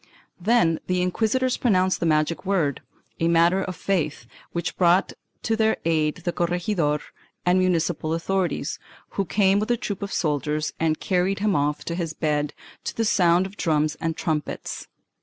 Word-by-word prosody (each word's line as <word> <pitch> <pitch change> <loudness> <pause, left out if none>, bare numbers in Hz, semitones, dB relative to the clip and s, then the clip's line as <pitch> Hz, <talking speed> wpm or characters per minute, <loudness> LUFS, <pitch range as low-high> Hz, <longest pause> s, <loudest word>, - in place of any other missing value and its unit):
Then 175 -5 +3
the 180 0 +1
inquisitors 230 +7 +1
pronounced 185 -5 +2
the 170 - 0
magic 155 +1 +1
word 180 -8 0 0.2
— - - -41
a 165 - +2
matter 170 +3 +4
of 185 -1 -4
faith 160 -4 -1
— - - -24
which 170 0 -3
brought 180 +1 +3 0.3
to 225 - +1
their 220 0 +2
aid 160 +1 +1
the 175 - +1
corregidor 170 -3 0 0.5
and 180 +1 +4
municipal 165 -3 +1
authorities, 185 +1 -1 0.3
who 195 - -2
came 195 +1 +3
with 215 - -2
a 240 - +2
troop 205 -3 -4
of 200 - -4
soldiers 150 -1 -1
and 160 -1 +1
carried 185 +1 +1
him 205 -2 +1
off 145 +1 0
on 170 - -2
his 165 -3 -2
bed, 150 -2 -1 0.3
to - - -4
the 225 - +1
sound 180 -3 +4
of 195 +2 -9
drums 155 -2 +1
and 165 -1 -1
trumpets. 155 -3 -3
175 Hz, 175 wpm, -24 LUFS, 160-195 Hz, 0.5 s, matter